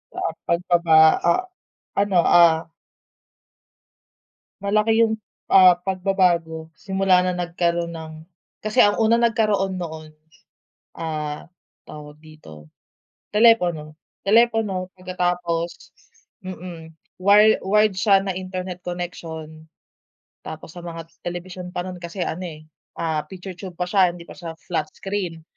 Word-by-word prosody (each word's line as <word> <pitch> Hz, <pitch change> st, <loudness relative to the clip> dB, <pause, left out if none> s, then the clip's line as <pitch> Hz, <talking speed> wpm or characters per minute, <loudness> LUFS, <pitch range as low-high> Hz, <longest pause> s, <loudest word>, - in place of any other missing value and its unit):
Ah, -, -, -2 dB, 0.2 s
pagbaba 170 Hz, -1 st, +2 dB, 0.3 s
ah, 170 Hz, -, +3 dB, 0.5 s
ano, 200 Hz, -2 st, +2 dB
ah. 165 Hz, -1 st, +5 dB, 1.9 s
Malaki 215 Hz, +3 st, +3 dB
yung, 220 Hz, -, -1 dB, 0.4 s
ah, 185 Hz, -2 st, +8 dB
pagbabago 175 Hz, -4 st, 0 dB
simula 190 Hz, +3 st, +2 dB
na 180 Hz, 0 st, 0 dB
nagkaroon 170 Hz, -1 st, -1 dB
ng 160 Hz, -1 st, -8 dB, 0.5 s
kasi 215 Hz, +4 st, +3 dB
ang 205 Hz, 0 st, +4 dB
unang 230 Hz, +1 st, +3 dB
nagkaroon 210 Hz, -5 st, +1 dB
noon, 160 Hz, -3 st, -7 dB, 0.9 s
ah, 155 Hz, -2 st, -4 dB, 0.4 s
tawag 150 Hz, 0 st, -11 dB
dito, 150 Hz, -, -15 dB, 0.6 s
telepono, 180 Hz, -9 st, +3 dB, 0.3 s
telepono 215 Hz, -4 st, +2 dB
pagkatapos, 175 Hz, -2 st, -1 dB, 0.7 s
mm, 175 Hz, -3 st, -9 dB, 0.2 s
wire 210 Hz, +3 st, +5 dB
wired 210 Hz, +1 st, +3 dB
siya 195 Hz, 0 st, +3 dB
na 190 Hz, -, -1 dB
internet 185 Hz, -1 st, -6 dB
connection. 160 Hz, -3 st, -7 dB, 0.8 s
Tapos 160 Hz, 0 st, -8 dB
sa -, -, -7 dB
mga 165 Hz, -1 st, -7 dB, 0.2 s
telebisyon 180 Hz, +1 st, -6 dB
pa 180 Hz, -, -2 dB
nun 180 Hz, 0 st, -7 dB
kasi 170 Hz, +2 st, -6 dB
ano 180 Hz, +2 st, -3 dB
eh 155 Hz, -2 st, -9 dB, 0.7 s
picture 185 Hz, +1 st, -8 dB
tube 185 Hz, -3 st, -9 dB
pa 180 Hz, -, -1 dB
siya 185 Hz, 0 st, +4 dB
hindi 170 Hz, -1 st, -11 dB
pa -, -, -12 dB
siya 165 Hz, -2 st, -7 dB
flat 165 Hz, -2 st, -3 dB
screen. 190 Hz, -5 st, -4 dB
180 Hz, 115 wpm, -22 LUFS, 165-195 Hz, 1.9 s, ah